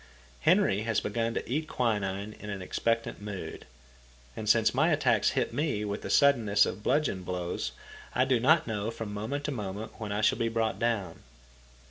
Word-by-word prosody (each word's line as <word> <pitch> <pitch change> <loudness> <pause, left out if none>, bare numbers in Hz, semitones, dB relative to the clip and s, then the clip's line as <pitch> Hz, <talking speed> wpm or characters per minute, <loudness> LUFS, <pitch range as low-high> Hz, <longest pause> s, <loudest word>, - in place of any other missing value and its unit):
Henry 95 +10 +3
has 115 -1 +1
begun 115 +2 -2
to - - -3
eat 155 +6 -1
quinine 105 -5 -1
in 105 - -8
an 100 -2 -4
expectant 115 +3 -1
mood. 100 -2 -7 0.7
And, - - -3
since - - +4
my - - +3
attacks - - +2
hit - - 0
me 140 -9 -1
with 100 0 -3
the - - -6
suddenness 115 -8 +4
of 105 - -4
bludgeon 130 -6 +1
blows 90 -1 -3 0.4
I 125 +2 +4
do 130 -2 +2
not 155 +6 +4
know 110 -2 -2
from 110 -2 -6
moment 115 +8 -3
to 150 - -2
moment 105 -3 -5
when 105 -2 -4
I 105 +1 -1
shall - - +3
be 115 - +1
brought 115 -1 -1
down. 105 -8 -1
110 Hz, 180 wpm, -29 LUFS, 100-120 Hz, 0.7 s, since